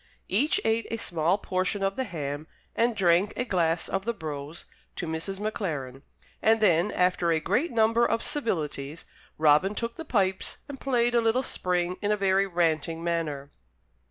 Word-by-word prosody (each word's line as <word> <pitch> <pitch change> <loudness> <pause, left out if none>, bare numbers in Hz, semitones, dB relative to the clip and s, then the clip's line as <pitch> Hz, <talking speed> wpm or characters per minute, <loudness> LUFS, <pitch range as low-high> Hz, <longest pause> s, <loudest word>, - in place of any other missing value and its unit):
Each 280 - +2
ate 225 +1 +1
a 230 - -2
small 170 -3 +1
portion 190 +1 -1
of 195 0 0
the 260 - -2
ham 150 - -5 0.3
and 235 0 +2
drank 180 +1 +3
a 245 - 0
glass 170 -6 +1
of 195 0 -2
the 235 +2 -2
brose 150 -2 -6 0.3
to - - -4
Mrs. 165 +4 -3
Maclaren; 155 - -3 0.4
and 225 +1 +4
then, 190 -1 +3
after 180 -2 +1
a 165 -1 +3
great 275 - 0
number 230 +1 +3
of 230 -1 +1
civilities, 155 - -2 0.3
Robin 155 +6 +4
took 230 +1 -4
the 325 - -5
pipes 190 -9 0
and 280 -2 -8
played 240 -3 +1
a 235 - +4
little 230 +3 +2
spring 180 -3 -1
in 205 0 0
a 210 - +2
very 195 0 +2
ranting 165 -2 0
manner. 155 -5 -2
190 Hz, 170 wpm, -27 LUFS, 165-225 Hz, 0.4 s, and